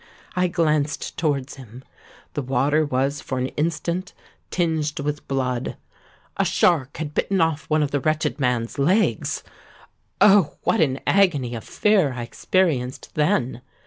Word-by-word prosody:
I 180 0 +2
glanced 155 -4 0
towards 140 -4 -1
him: 125 -1 -12 0.5
the 145 - -2
water 135 +4 +1
was 140 0 -1
for 130 - -4
an 130 +1 -1
instant 170 +4 -2 0.4
tinged 160 -4 -1
with 150 +1 -3
blood—a 130 -2 -4
shark 145 -6 +2
had 150 -2 -4
bitten 195 +4 0
off 160 -2 0
one 155 0 +3
of 145 - -2
the 145 - +1
wretched 155 +2 0
man's 125 -2 -1
legs! 185 +10 +1 0.8
Oh! 195 -6 +5
what 225 - +2
an 135 -3 +1
agony 150 -11 +2
of 115 - -5
fear 195 -10 +2
I 120 -1 -5
experienced 135 -2 -1
then. 150 -6 0
150 Hz, 140 wpm, -23 LUFS, 130-165 Hz, 0.8 s, Oh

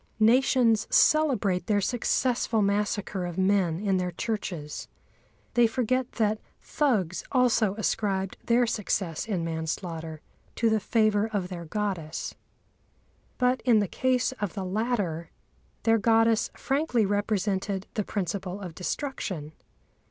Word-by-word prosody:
Nations 230 -1 +4
celebrate 245 -12 +3
their 210 -2 +3
successful 240 0 +1
massacre 200 -1 -1
of 175 0 -5
men 190 -3 +2
in 195 -2 +1
their 180 -1 -1
churches. 175 -5 -4 0.7
They 240 -1 +5
forget 255 +2 -1
that 215 -1 0 0.2
Thugs 210 - 0
also 235 -6 +3
ascribed 195 -3 -1
their 240 +1 +3
success 195 -6 -2
in 185 -6 -1
manslaughter 160 -1 -4 0.3
to 230 -1 +2
the 220 - +3
favour 215 -1 +2
of 195 -4 -2
their 175 -2 -6
goddess. 175 -4 -3 1.0
But 250 0 +2
in 240 -3 +4
the 205 -1 +2
case 255 +3 +1
of 205 -2 -2
the 195 -2 -3
latter 190 -5 -1 0.5
their 225 0 +4
goddess 225 +1 +3
frankly 270 -5 +1
represented 200 -1 -1
the 210 - -1
principle 190 -1 -3
of 180 -4 -7
destruction. 180 - -4
205 Hz, 120 wpm, -27 LUFS, 185-230 Hz, 1.0 s, They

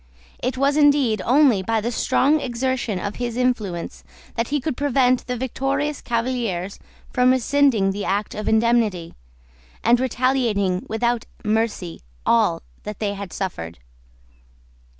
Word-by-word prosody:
It 255 +1 -2
was 280 +2 +2
indeed 280 -8 +4
only 255 -5 +4
by 225 +4 0
the 230 +3 -2
strong 290 +5 +2
exertion 245 -3 -2
of 200 +3 -4
his 240 -1 -3
influence 215 -9 -2 0.3
that 230 0 -1
he 295 +1 0
could 275 0 -3
prevent 255 -2 +2
the 250 -1 -2
victorious 275 +3 -2
Cavaliers 230 -6 -2 0.3
from 250 0 +4
rescinding 255 -5 +3
the 200 +1 -4
act 200 +2 -1
of 215 - -3
indemnity, 220 -6 +1 0.7
and 235 +1 +4
retaliating 240 -7 0
without 235 +1 0 0.2
mercy 210 -5 -1 0.2
all - - +2 0.2
that 210 -1 -7
they 205 -2 -2
had 200 -3 -7
suffered. 85 - -5
235 Hz, 130 wpm, -22 LUFS, 205-260 Hz, 0.7 s, indeed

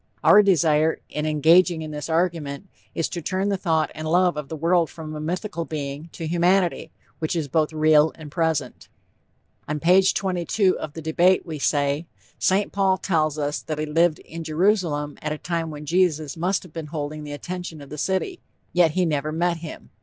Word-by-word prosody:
Our 210 - +8
desire, 160 -5 +3
in 150 +1 -2
engaging 160 +2 +4
in 155 - -6
this 150 +1 -6
argument, 165 -1 -1 0.3
is 165 - 0
to 175 - -5
turn 190 +4 -1
the 200 - +1
thought 165 -4 0
and 155 0 -6
love 175 +1 +3
of 150 -2 -6
the 160 - -4
world 165 +1 +2
from 155 -2 -8
a - - -5
mythical 170 +2 -3
being, 150 0 -5
to 165 - -6
humanity, 175 0 +1 0.3
which 155 +1 -2
is 160 -4 -1
both 155 +2 +1
real 155 0 +4
and 150 -2 -11
present. 160 -6 -1 0.8
On 150 0 -2
page 185 +4 +4
22 185 +1 +1
of 150 - -6
The 160 - -8
Debate, 175 +4 +3
we 160 -3 -6
say: 145 +3 0 0.3
"St. 195 +2 +2
Paul 195 -1 +2
tells 155 -6 0
us 145 0 -2
that 155 -2 -4
he 155 - -1
lived 160 +1 +2
in 165 0 -9
Jerusalem 160 -3 0
at 155 0 -2
a - - -5
time 165 0 -3
when 150 -1 -8
Jesus 160 -3 +1
must 180 +3 0
have 175 -4 -15
been 160 -2 -6
holding 150 0 -5
the 145 -1 -7
attention 175 +1 -6
of 140 -1 -12
the 150 - -6
city; 195 - -1 0.3
yet 175 -3 +4
he 180 - +3
never 155 -1 -1
met 170 +2 0
him." 160 -1 -10
160 Hz, 195 wpm, -23 LUFS, 150-180 Hz, 0.8 s, Our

